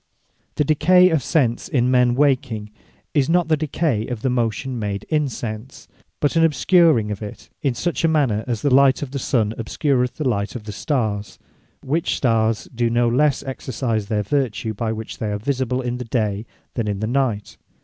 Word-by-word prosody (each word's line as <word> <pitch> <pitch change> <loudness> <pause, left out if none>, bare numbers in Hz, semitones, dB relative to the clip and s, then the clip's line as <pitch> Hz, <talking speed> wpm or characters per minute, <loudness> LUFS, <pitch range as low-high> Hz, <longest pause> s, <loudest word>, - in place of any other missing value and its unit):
Memory - - -47
The - - +2
decay 180 +5 +5
of 160 -3 +2
Sense 125 -2 0
in 125 -8 +1
men 125 -1 +3
waking, 130 -6 0 0.4
is 145 -1 +2
not 175 -1 +2
the 155 - +4
decay 150 -6 -1
of 120 -3 -5
the 130 - +1
motion 120 +1 -1
made 100 -2 -3
in 150 -2 +1
sense; 115 +1 -7 0.3
but 145 +2 +1
an 165 - +4
obscuring 160 - +4
of 105 - -5
it, 105 -1 -9
in 135 -4 0
such 175 +7 -2
manner, 135 -10 +1
as 120 -4 -2
the 140 -3 +2
light 135 +1 +5
of 135 - -6
the 140 - -3
Sun 110 -5 0
obscureth 125 +2 0
the 150 - -2
light 100 -3 -1
of 120 - -6
the 105 - -7
Starres; 105 -5 -2 0.5
which 155 +5 0
starrs 115 -3 +1
do 120 -1 +1
no 120 +1 +2
less 135 +4 +2
exercise 120 -5 -3
their 105 -1 0
vertue 115 -2 -1
by 110 +1 -2
which 110 0 -6
they 110 - -2
are 105 - -1
visible, 130 +2 -1
in 125 0 -3
the 125 - -5
day, 110 -2 -1 0.3
than 115 -3 -2
in 100 -1 -2
the - - -5
night. 120 -4 -1
125 Hz, 195 wpm, -21 LUFS, 110-140 Hz, 0.5 s, decay